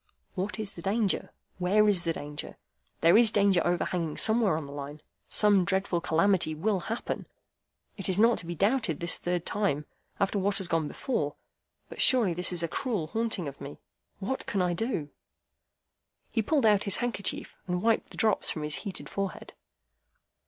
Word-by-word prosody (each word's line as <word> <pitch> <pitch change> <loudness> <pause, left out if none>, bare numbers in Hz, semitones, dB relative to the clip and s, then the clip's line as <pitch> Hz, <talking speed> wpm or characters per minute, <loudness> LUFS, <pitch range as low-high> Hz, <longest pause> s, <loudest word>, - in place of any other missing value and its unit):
"What 195 +4 -3
is 215 -2 -4
the 170 - -10
danger? 200 +2 0 0.3
Where 205 +4 +3
is 190 -4 +3
the 165 - 0
danger? 145 -1 -7 0.4
There 170 +6 +6
is 235 -2 +8
danger 200 -4 +3
overhanging 175 -2 -1
somewhere 220 -6 +3
on 155 - -5
the 140 - -10
Line. 145 +1 -7 0.3
Some 205 -3 +5
dreadful 190 -1 0
calamity 165 -1 +1
will 195 +5 0
happen. 230 +2 -4 0.7
It 195 - -1
is 185 - +1
not 230 +2 +4
to 170 - -9
be 175 - -4
doubted 205 - +1
this 170 0 +3
third 175 -1 -2
time, 150 -8 -1 0.3
after 200 0 0
what 200 +1 +1
has 190 - 0
gone 165 -2 0
before. 150 - -3 0.5
But - - -6
surely 235 -9 +5
this 180 +2 +4
is 175 -1 +3
a - - 0
cruel 215 - -2
haunting 225 -7 -1
of 140 0 -9
me. 140 +1 -8 0.4
What 235 +7 -4
can 200 - -1
I 180 -1 +1
do?" 170 - -3 1.2
He 225 - +1
pulled 275 +3 +1
out 210 -2 +4
his 200 - +4
handkerchief, 235 -5 -3
and 180 0 -2
wiped 225 0 +1
the - - -12
drops 215 -2 +1
from 155 - -2
his 150 -1 0
heated 200 -4 -6
forehead. 195 -1 -5
190 Hz, 180 wpm, -28 LUFS, 170-215 Hz, 1.2 s, is